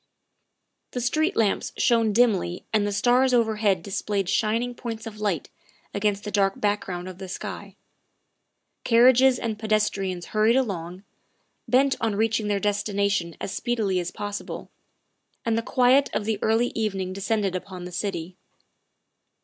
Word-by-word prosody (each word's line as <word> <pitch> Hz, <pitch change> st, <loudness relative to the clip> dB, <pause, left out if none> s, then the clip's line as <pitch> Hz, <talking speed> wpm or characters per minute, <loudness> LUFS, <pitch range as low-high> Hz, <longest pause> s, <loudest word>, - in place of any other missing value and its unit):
The 250 Hz, -, -2 dB
street 310 Hz, +9 st, +1 dB
lamps 215 Hz, -3 st, +1 dB
shone 230 Hz, -2 st, +3 dB
dimly 205 Hz, -6 st, +1 dB
and 210 Hz, -1 st, +2 dB
the -, -, -1 dB
stars 250 Hz, +5 st, +3 dB
overhead 215 Hz, -6 st, +2 dB
displayed 195 Hz, 0 st, -2 dB
shining 230 Hz, +3 st, 0 dB
points 230 Hz, -2 st, -6 dB
of 215 Hz, -2 st, -8 dB
light 200 Hz, -7 st, -2 dB, 0.4 s
against 205 Hz, 0 st, 0 dB
the 210 Hz, -, -5 dB
dark 195 Hz, -1 st, +1 dB
back 205 Hz, 0 st, 0 dB
ground 180 Hz, -1 st, -5 dB
of 185 Hz, 0 st, -9 dB
the 190 Hz, -, -6 dB
sky. -, -, -7 dB, 1.1 s
Carriages 250 Hz, +2 st, +5 dB
and 220 Hz, -3 st, -3 dB
pedestrians 200 Hz, -4 st, 0 dB
hurried 215 Hz, +2 st, +4 dB
along, 185 Hz, -7 st, -2 dB, 0.6 s
bent 265 Hz, +2 st, +3 dB
on 225 Hz, -3 st, 0 dB
reaching 220 Hz, 0 st, +1 dB
their 205 Hz, -1 st, +1 dB
destination 200 Hz, -4 st, 0 dB
as -, -, -4 dB
speedily 215 Hz, -6 st, 0 dB
as 175 Hz, -, -3 dB
possible, 205 Hz, 0 st, -6 dB, 0.7 s
and 230 Hz, -1 st, +1 dB
the 230 Hz, -, +1 dB
quiet 255 Hz, +3 st, +3 dB
of 205 Hz, -, -1 dB
the 215 Hz, -2 st, -1 dB
early 225 Hz, +2 st, +2 dB
evening 195 Hz, -4 st, -2 dB
descended 200 Hz, -1 st, -1 dB
upon 185 Hz, 0 st, -6 dB
the 180 Hz, -, -7 dB
city. 180 Hz, -1 st, -4 dB
210 Hz, 145 wpm, -25 LUFS, 195-230 Hz, 1.1 s, Carriages